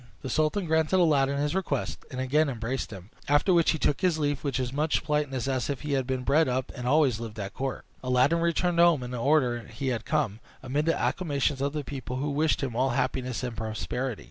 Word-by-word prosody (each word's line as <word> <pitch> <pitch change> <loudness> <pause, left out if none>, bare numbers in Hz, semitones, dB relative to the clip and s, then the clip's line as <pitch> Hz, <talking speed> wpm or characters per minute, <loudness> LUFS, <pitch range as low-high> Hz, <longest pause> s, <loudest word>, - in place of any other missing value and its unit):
The 130 - -4
sultan 155 +5 +1
granted 160 +3 +2
Aladdin 140 -5 +3
his 145 +2 0
request, 175 -8 -2
and 130 - -6
again 145 +4 +2
embraced 125 +1 -3
him. 95 0 -10 0.2
After 145 +6 +3
which 170 -2 +4
he 160 - +2
took 145 0 0
his 180 -4 +2
leave 145 -2 -1
with 140 -3 -1
as 125 -1 -2
much 150 +2 0
politeness 145 -5 -1
as 130 -1 -1
if 140 - -3
he 150 - -4
had 135 -2 0
been 130 -1 -2
bred 150 +4 +3
up 130 +1 -1
and 125 - -7
had - - +1
always 140 -6 +3
lived 110 -2 -7
at 100 -1 -5
court. 135 0 -4 0.2
Aladdin 130 +6 +3
returned 170 +1 +1
home 170 -6 +5
in 125 - -6
the 125 - -4
order 130 -2 +2
he 135 -2 -3
had 120 -3 -2
come, 130 -9 -1 0.2
amid 145 +4 -1
the 165 - +2
acclamations 145 -5 0
of 140 +1 0
the 150 -1 -3
people, 130 -1 -6
who 145 +3 -2
wished 150 +2 +1
him 125 -4 -3
all 130 +3 +2
happiness 130 -2 -1
and 120 -2 -3
prosperity. 110 +2 -3
140 Hz, 230 wpm, -27 LUFS, 125-155 Hz, 0.2 s, home